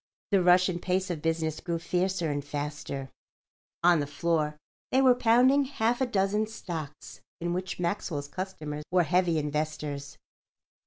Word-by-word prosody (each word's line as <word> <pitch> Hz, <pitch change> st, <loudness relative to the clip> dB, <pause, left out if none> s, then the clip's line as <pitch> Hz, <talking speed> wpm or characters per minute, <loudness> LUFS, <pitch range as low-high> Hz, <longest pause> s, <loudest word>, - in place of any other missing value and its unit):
The 195 Hz, -2 st, +4 dB
rush 180 Hz, +1 st, +5 dB
and 175 Hz, -2 st, -3 dB
pace 185 Hz, 0 st, 0 dB
of 160 Hz, -4 st, -4 dB
business 160 Hz, -1 st, -1 dB
grew 170 Hz, -1 st, -2 dB
fiercer 175 Hz, -1 st, 0 dB
and 145 Hz, 0 st, -2 dB
faster. 145 Hz, -2 st, -5 dB, 0.7 s
On 175 Hz, -1 st, +6 dB
the 145 Hz, -, -1 dB
floor 150 Hz, 0 st, 0 dB, 0.3 s
they 260 Hz, -, +4 dB
were 260 Hz, -2 st, +6 dB
pounding 250 Hz, +4 st, +4 dB
half 245 Hz, -2 st, 0 dB
a 260 Hz, -, +2 dB
dozen 210 Hz, 0 st, +1 dB
stocks 165 Hz, -9 st, -7 dB, 0.2 s
in 175 Hz, 0 st, -2 dB
which 185 Hz, 0 st, -4 dB
Maxwell's 170 Hz, -5 st, -2 dB
customers 155 Hz, -3 st, -5 dB
were 180 Hz, -1 st, +4 dB
heavy 175 Hz, +1 st, +2 dB
investors. 150 Hz, -1 st, -3 dB
175 Hz, 150 wpm, -28 LUFS, 150-190 Hz, 0.7 s, On